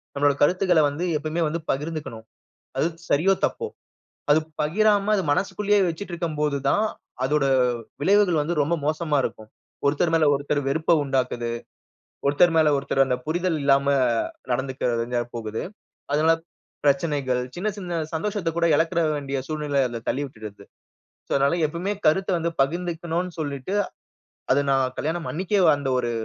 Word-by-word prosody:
நம்மோட 145 0 +3
கருத்துக்கள 180 +1 +4
வந்து 150 +5 -3
எப்பவுமே 155 +3 -3
வந்து 160 +3 -2
பகிர்ந்துக்கணும். 145 -6 -5 0.5
அது - - +2 0.2
சரியோ! 170 +7 +4
தப்போ! 460 - -3 0.6
அது 150 - +6 0.2
பகிராம 205 +6 +2
அது 195 - 0
மனசுக்குள்ளேயே 200 +5 +1
வச்சிக்கிட்டு 175 +3 -6
இருக்கும்போது 150 -4 -1
தான், 210 +8 +2 0.4
அதோட 145 +1 +2 0.6
விளைவுகள் 190 -2 +4
வந்து 165 +4 -1
ரொம்ப 155 +4 +1
மோசமா 155 -1 0
இருக்கும். 110 -3 -5 0.4
ஒருத்தர் 155 +4 +1
மேல 160 -1 +4
ஒருத்தர் 145 +1 -1
வெறுப்ப 160 +4 +1
உண்டாக்குது, 125 -3 -1 0.7
ஒருத்தர் 155 +5 +4
மேல 155 -1 +5
ஒருத்தர் 135 0 +2
அந்த 130 -1 0
புரிதல் 170 +1 0
இல்லாம 140 0 +4 0.7
நடந்துக்க 130 +2 -2 0.2
வேண்டியதா 120 +1 -1
போகுது. 110 -1 -4 0.5
அதனால 160 +2 +4 0.5
பிரச்சனைகள், 140 -3 +1
சின்ன, 180 +4 -2
சின்ன 175 -4 -3
சந்தோஷத்தக் 165 0 -2
கூட 170 - +2
இழக்கிற 165 +2 +1
வேண்டிய 140 -1 -3
சூழ்நிலை 150 -3 0
அதில 120 -1 -6
தள்ளி 140 - 0
விட்டுருது. 110 -6 -10 0.6
சோ, - - -37
அதனால 140 +4 +2
எப்பமே 170 +6 -3
கருத்த 190 +5 +3
வந்து 170 +1 -1
பகிர்ந்துக்கணுன்னு 170 +3 -2
சொல்லிட்டு, 145 +3 -3 0.8
அது 140 - +3
நான் 130 -1 +1
கல்யாணம் 165 +2 -2
அன்னக்கே 190 +4 +1 0.2
அந்த 140 -2 -2
ஒரு 120 -1 -1
155 Hz, 140 wpm, -24 LUFS, 140-175 Hz, 0.8 s, அது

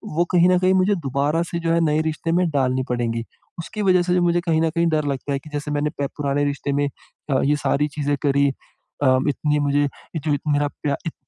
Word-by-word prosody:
वो 170 +2 +2
कहीं 180 0 +5
न 180 - +4
कहीं 185 +1 +3
मुझे 190 +2 +3
दोबारा 145 0 0
से 170 - -2
जो 165 -1 -1
है 170 - +3
नए 155 0 +2
रिश्ते 165 +1 -3
में 175 0 +2
डालनी 130 -3 0
पड़ेंगी। 115 -2 -1 0.4
उसकी 210 +6 -5
वजह 185 -2 +4
से 180 +1 +1
मुझे 175 0 +2
कहीं 165 -2 +1
न 165 - +2
कहीं 170 +1 0
डर 155 -2 0
लगता 140 0 -3
है 135 - -1
कि 155 - -14
जैसे 150 0 -3
मैंने 145 +1 0
प 140 - +1
पुराने 145 -1 0
रिश्ते 140 0 -2
में 145 0 +1 0.4
अ, 135 -2 +2
ये 145 +1 +3
सारी 145 0 0
चीज़ें 145 0 -1
करी। 140 0 +3 0.6
अ, 130 -1 +5
इतनी 150 +1 0
मुझे 145 0 +2 0.4
जो 150 -2 +2 0.2
मेरा 145 0 +2
प्या 145 0 -3
इत 165 - -3
150 Hz, 230 wpm, -22 LUFS, 140-170 Hz, 0.6 s, कहीं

